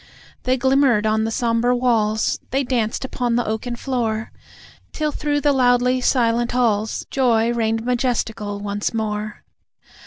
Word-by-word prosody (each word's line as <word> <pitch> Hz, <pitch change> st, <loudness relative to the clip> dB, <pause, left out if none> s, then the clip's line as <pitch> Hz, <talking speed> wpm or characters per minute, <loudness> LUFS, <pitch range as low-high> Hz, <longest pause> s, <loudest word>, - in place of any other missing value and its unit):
They 255 Hz, +1 st, +2 dB
glimmered 260 Hz, -4 st, +3 dB
on 220 Hz, 0 st, +1 dB
the -, -, -1 dB
sombre 235 Hz, +1 st, +1 dB
walls, 225 Hz, -3 st, +1 dB
They 270 Hz, +2 st, 0 dB
danced 245 Hz, -1 st, -1 dB
upon 245 Hz, -2 st, -1 dB
the 240 Hz, -, +1 dB
oaken 220 Hz, +3 st, -3 dB
floor, 230 Hz, -4 st, -2 dB, 0.6 s
Till 305 Hz, -1 st, -1 dB
through 290 Hz, 0 st, -1 dB
the 290 Hz, -1 st, +3 dB
loudly 250 Hz, 0 st, +3 dB
silent 240 Hz, -2 st, +1 dB
halls 220 Hz, -3 st, 0 dB
Joy 235 Hz, -3 st, +2 dB
reigned 225 Hz, -1 st, -1 dB
majestical 230 Hz, -4 st, -1 dB
once 205 Hz, +2 st, -3 dB
more. 210 Hz, -1 st, -3 dB
235 Hz, 135 wpm, -21 LUFS, 220-250 Hz, 0.6 s, glimmered